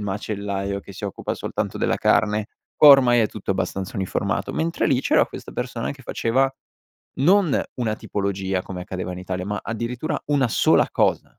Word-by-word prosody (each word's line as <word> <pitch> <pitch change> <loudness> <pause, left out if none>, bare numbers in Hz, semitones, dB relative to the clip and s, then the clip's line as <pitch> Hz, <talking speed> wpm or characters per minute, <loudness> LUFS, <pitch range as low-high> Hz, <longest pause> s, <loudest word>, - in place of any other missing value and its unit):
macellaio 100 -1 -3
che 100 - -12
si 100 - -8
occupa 100 - -4
soltanto - - -3
della - - +1
carne, 105 0 +2 0.3
ormai 135 -5 +8
è 110 - +2
tutto 100 -2 -3
abbastanza 95 +2 -3
uniformato. 95 -1 -2
Mentre 165 +1 0
lì 130 -2 +2
c'era - - +3
questa - - -10
persona 125 -1 -3
che 135 -1 -14
faceva, 130 +3 +1 0.7
non 180 0 +4 0.2
una 110 -3 -1
tipologia 95 -2 -2
come 90 -2 -7
accadeva 90 0 -5
in 90 - -7
Italia, 90 0 -4
ma 105 0 -3
addirittura 120 +7 -3
una 140 -4 +2
sola - - +3
cosa; - - 0
105 Hz, 165 wpm, -23 LUFS, 95-125 Hz, 0.7 s, ormai